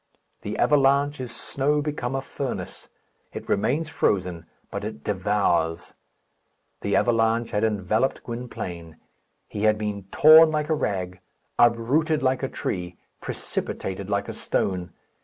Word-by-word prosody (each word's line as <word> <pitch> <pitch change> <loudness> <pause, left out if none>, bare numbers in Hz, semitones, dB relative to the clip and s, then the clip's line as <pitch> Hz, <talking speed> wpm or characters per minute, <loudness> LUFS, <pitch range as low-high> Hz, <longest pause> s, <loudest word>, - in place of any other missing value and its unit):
The - - -5
avalanche 140 0 +3
is 125 -2 -6
snow 145 +2 0
become 145 -4 -3
a 135 - -1
furnace. 135 0 -6 0.4
It - - -7
remains 125 +11 0
frozen, 90 - -1 0.2
but - - -4
it 70 - -6
devours. 90 -4 0 0.9
The 100 - 0
avalanche 115 0 +2
had 105 0 0
enveloped 110 +3 0
Gwynplaine. 90 -9 -7 0.5
He 105 +1 -3
had 110 0 +4
been 105 -2 -4
torn 160 +1 +8
like 150 0 -1
a - - +3
rag, 90 -9 -2 0.4
uprooted 130 +7 +3
like 130 -1 +1
a 135 - -2
tree, 90 -1 -4 0.2
precipitated 95 +1 -4
like 100 0 0
a - - -5
stone. 90 -2 -2
115 Hz, 130 wpm, -25 LUFS, 95-135 Hz, 0.9 s, torn